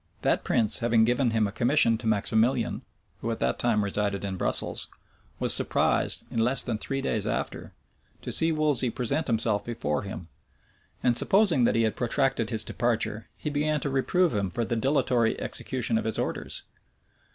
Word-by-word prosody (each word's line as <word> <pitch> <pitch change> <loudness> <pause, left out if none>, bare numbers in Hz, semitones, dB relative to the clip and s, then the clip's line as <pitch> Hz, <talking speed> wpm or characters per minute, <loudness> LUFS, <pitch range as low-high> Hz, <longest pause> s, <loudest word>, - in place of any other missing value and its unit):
That - - +1
prince, 110 -3 +1
having 115 -1 +3
given 125 +1 +1
him 110 -1 +1
a 100 - -3
commission 120 +1 +3
to 115 - -5
Maximilian, 110 +3 +1 0.4
who 115 - -4
at 115 - -3
that - - 0
time 115 -3 +1
resided 100 0 -1
in 95 -1 -3
Brussels, - - -1 0.5
was - - +3
surprised, - - +1
in - - -2
less 125 +4 +3
than 115 -3 -3
three 135 +3 -3
days 110 -6 -1
after, - - -3 0.5
to - - -5
see 165 0 +4
Wolsey 150 -5 +1
present 125 +7 -1
himself 110 -3 +1
before 75 -11 -2
him, 95 -5 -7 0.8
and 125 -1 +3
supposing 180 - +4
that - - +2
he 115 - +3
had 110 - 0
protracted 125 -1 0
his 110 -3 0
departure, 110 -2 -1
he 150 - -4
began 150 +1 0
to 140 - -2
reprove 170 +6 +1
him 100 -3 -1
for 120 +4 -2
the 120 +1 -2
dilatory 125 -2 +1
execution 115 -3 0
of - - -5
his 110 - -1
orders. - - -3
115 Hz, 175 wpm, -27 LUFS, 110-135 Hz, 0.8 s, see